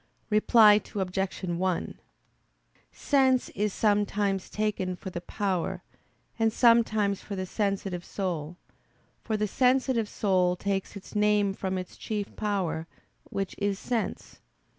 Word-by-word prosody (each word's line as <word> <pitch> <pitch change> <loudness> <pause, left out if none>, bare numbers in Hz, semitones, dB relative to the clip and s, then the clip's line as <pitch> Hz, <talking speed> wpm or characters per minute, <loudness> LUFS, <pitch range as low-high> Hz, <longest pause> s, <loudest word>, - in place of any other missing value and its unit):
Reply 215 0 +6
Obj. 190 0 -2
1: 180 0 -2 0.9
Sense 265 -3 +2
is 210 +1 -1
sometimes 205 -2 +1
taken 205 -4 -1
for 190 +1 -8
the 175 - -5
power, 190 -2 -2 0.6
and 225 0 +3
sometimes 220 -4 +3
for 200 - -6
the 185 -1 -3
sensitive 195 -3 -2
soul; 175 -5 -4 0.6
for 220 - -2
the 210 0 0
sensitive 250 -1 +2
soul 185 -3 +2
takes 195 +2 -2
its 200 - -10
name 210 -1 +3
from 190 -1 -3
its 185 0 -7
chief 210 -2 -4
power, 190 -6 -2 0.4
which 195 -1 -3
is 200 -1 0
sense. 230 0 -3
200 Hz, 120 wpm, -28 LUFS, 185-215 Hz, 0.9 s, Reply